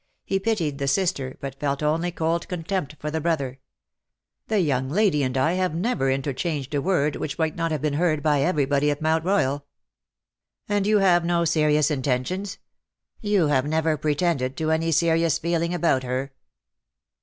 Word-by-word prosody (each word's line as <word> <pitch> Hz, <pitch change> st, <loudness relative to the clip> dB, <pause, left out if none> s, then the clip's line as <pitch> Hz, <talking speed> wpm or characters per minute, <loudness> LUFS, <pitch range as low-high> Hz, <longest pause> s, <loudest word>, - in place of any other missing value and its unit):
He 195 Hz, -, 0 dB
pitied 175 Hz, -9 st, -1 dB
the 140 Hz, -, -1 dB
sister, 140 Hz, -5 st, 0 dB
but 135 Hz, 0 st, -6 dB
felt 140 Hz, 0 st, -1 dB
only 165 Hz, +4 st, 0 dB
cold 165 Hz, 0 st, -1 dB
contempt 175 Hz, -3 st, -3 dB
for 150 Hz, +2 st, -5 dB
the 160 Hz, +1 st, -2 dB
brother. 140 Hz, -5 st, -1 dB, 0.4 s
" -, -, -62 dB
The 215 Hz, -2 st, +1 dB
young 135 Hz, -6 st, 0 dB
lady 180 Hz, -3 st, +2 dB
and 130 Hz, -1 st, -1 dB
I 155 Hz, +6 st, +2 dB
have 185 Hz, -3 st, 0 dB
never 175 Hz, -, 0 dB
inter 135 Hz, +1 st, -1 dB
changed 145 Hz, -1 st, -3 dB
a 145 Hz, -, +1 dB
word 150 Hz, -4 st, +1 dB
which 140 Hz, -, -4 dB
might 160 Hz, -2 st, 0 dB
not 165 Hz, -1 st, -1 dB
have 155 Hz, -2 st, -2 dB
been 150 Hz, -2 st, 0 dB
heard 155 Hz, -1 st, +1 dB
by 150 Hz, -3 st, +2 dB
everybody 145 Hz, -3 st, +1 dB
at 145 Hz, 0 st, -1 dB
Mount 160 Hz, +1 st, +1 dB
Royal." 160 Hz, -7 st, +1 dB
^^ -, -, -29 dB, 1.0 s
And 205 Hz, -1 st, 0 dB
you 215 Hz, 0 st, +4 dB
have 185 Hz, -3 st, +4 dB
had 170 Hz, -, -4 dB
no 170 Hz, -1 st, +2 dB
serious 150 Hz, -1 st, +2 dB
intentions 150 Hz, -, -2 dB, 0.3 s
— -, -, -41 dB
you 180 Hz, -7 st, +3 dB
have 135 Hz, -1 st, +2 dB
never 160 Hz, 0 st, +1 dB
pretended 150 Hz, -3 st, -1 dB
to 160 Hz, -1 st, 0 dB
any 165 Hz, +1 st, +1 dB
serious 165 Hz, 0 st, +2 dB
eeling 170 Hz, 0 st, -1 dB
about 170 Hz, -7 st, +1 dB
her." 130 Hz, +2 st, -3 dB
155 Hz, 190 wpm, -24 LUFS, 140-175 Hz, 1.0 s, you